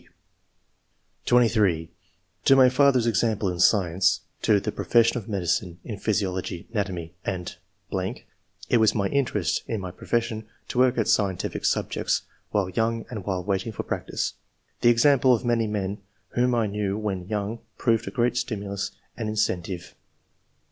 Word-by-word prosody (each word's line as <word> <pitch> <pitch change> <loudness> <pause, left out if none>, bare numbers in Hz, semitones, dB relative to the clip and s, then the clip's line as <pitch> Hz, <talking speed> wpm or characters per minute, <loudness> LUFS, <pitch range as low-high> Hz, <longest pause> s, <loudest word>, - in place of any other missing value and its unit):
(6) - - -26 1.2
(23) 105 -9 +3 0.3
" 95 0 -41
To 135 - +7
my 130 -1 +7
father's 130 -2 +4
example 110 -2 +1
(in 90 -1 -4
science); 90 -2 +3 0.2
to 105 -2 +4
the - - -3
profession 115 +1 +3
of 110 0 -12
medicine 90 -2 -1
(in 105 -5 -6
physiology, 95 -5 -2
ana 105 -3 +1
tomy, 85 -3 -6
and 90 -2 -4 0.5
....). - - -15
It - - +6
was 110 -1 +4
my 100 -2 +1
interest 115 - 0
in 110 - -2
my 95 -2 -5
profession 115 +2 -2 0.2
to 125 - -1
work 125 -1 +4
at 115 - +1
scientific 95 -3 0
subjects, - - 0 0.3
while 100 -3 0
young 115 +4 -1
and 105 -6 -6
while 95 -3 -2
waiting 100 +4 -1
for 105 - -5
practice. - - -3 0.5
The 120 - +6
example 130 +1 +5
of 115 - -5
many 115 -2 +2
men 100 -1 -2 0.3
whom 125 0 +1
I 115 -2 +2
knew 100 -1 -2
when 95 -4 -3
young 105 +2 -3 0.2
proved 115 -1 +1
a - - -1
great 120 0 +1
stimulus 100 -5 -3 0.3
and 110 -2 -3
incen 105 -4 +1
tive." 90 -1 -7
105 Hz, 160 wpm, -25 LUFS, 95-115 Hz, 1.2 s, To